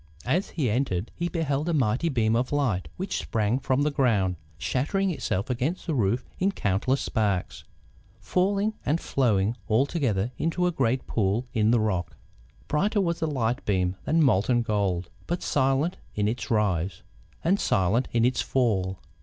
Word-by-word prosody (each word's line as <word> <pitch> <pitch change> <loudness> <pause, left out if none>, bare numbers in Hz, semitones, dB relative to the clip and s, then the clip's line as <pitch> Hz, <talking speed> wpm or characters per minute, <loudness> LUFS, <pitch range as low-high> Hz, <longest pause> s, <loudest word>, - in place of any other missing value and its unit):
As 170 +10 +1
he 150 -7 -1
entered 110 -4 -1
he 175 +1 -2
beheld 155 -2 -1
a 170 - +1
mighty 130 +4 +1
beam 115 -5 +2
of 125 +2 0
light 115 - 0
which - - -2
sprang 105 - 0
from 135 +1 +1
the 150 - +1
ground, 105 -10 +2 0.2
shattering 135 - 0
itself 100 - -2
against 130 +8 -2
the 165 - -1
roof 115 -2 +1
in 195 +2 +2
countless 105 - 0
sparks, 100 -5 -1 0.5
falling 200 +3 +1
and 155 +4 +1
flowing 110 - +1
all 115 +5 +3
together 125 - -1
into 165 +2 0
a 180 - +2
great 130 -5 0
pool 105 +3 0
in 110 -1 +2
the 120 0 +4
rock. 95 -6 -1 0.5
Brighter 200 +8 +1
was 170 -3 0
the 160 - 0
light 125 -3 -1
beam 95 -2 0
than 160 +1 +3
molten 120 0 +3
gold, 95 -5 -1 0.2
but 175 +1 -2
silent 135 +4 +1 0.2
in 105 -1 +1
its 115 0 -3
rise, 95 -6 0 0.4
and 190 +5 +2
silent 100 +7 +2
in 115 0 +3
its 125 +1 +2
fall. 95 -8 0
120 Hz, 165 wpm, -26 LUFS, 105-150 Hz, 0.5 s, the